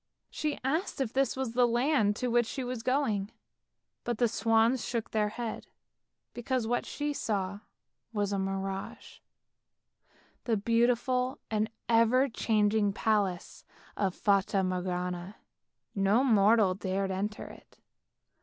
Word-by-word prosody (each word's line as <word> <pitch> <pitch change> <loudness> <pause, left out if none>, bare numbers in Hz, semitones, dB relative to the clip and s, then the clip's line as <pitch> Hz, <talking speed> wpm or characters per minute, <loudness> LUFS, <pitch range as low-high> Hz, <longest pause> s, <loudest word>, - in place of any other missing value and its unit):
She 300 -1 -2
asked 305 +7 -1
if 255 -4 -1
this 270 0 +1
was 260 -4 -2
the 245 0 +4
land 240 -3 +2
to 250 +3 -2
which 240 -1 +2
she 265 - -4
was 250 -2 -4
going, 225 -6 0 0.7
but 240 -2 -2
the 240 - +3
swans 225 +2 +2
shook 230 -2 -3
their 210 -1 +1
heads, 230 +1 -5 0.7
because 245 0 -2
what 240 +2 -1
she 295 0 -3
saw 200 -6 -2 0.5
was 205 -2 -1
a 200 - 0
mirage; 195 0 -4 1.3
the 230 -3 +1
beautiful 245 +4 +1
and 215 0 0 0.2
ever 235 +3 +4
changing 210 -3 +1
palace 200 -4 -1 0.3
of 190 -3 -1
Fata 195 -1 +2
Morgana. 180 +1 -3 0.6
No 200 +5 +3
mortal 215 -4 +4
dared 195 0 -2
enter 205 +3 -3
it. - - -14
220 Hz, 125 wpm, -30 LUFS, 200-245 Hz, 1.3 s, the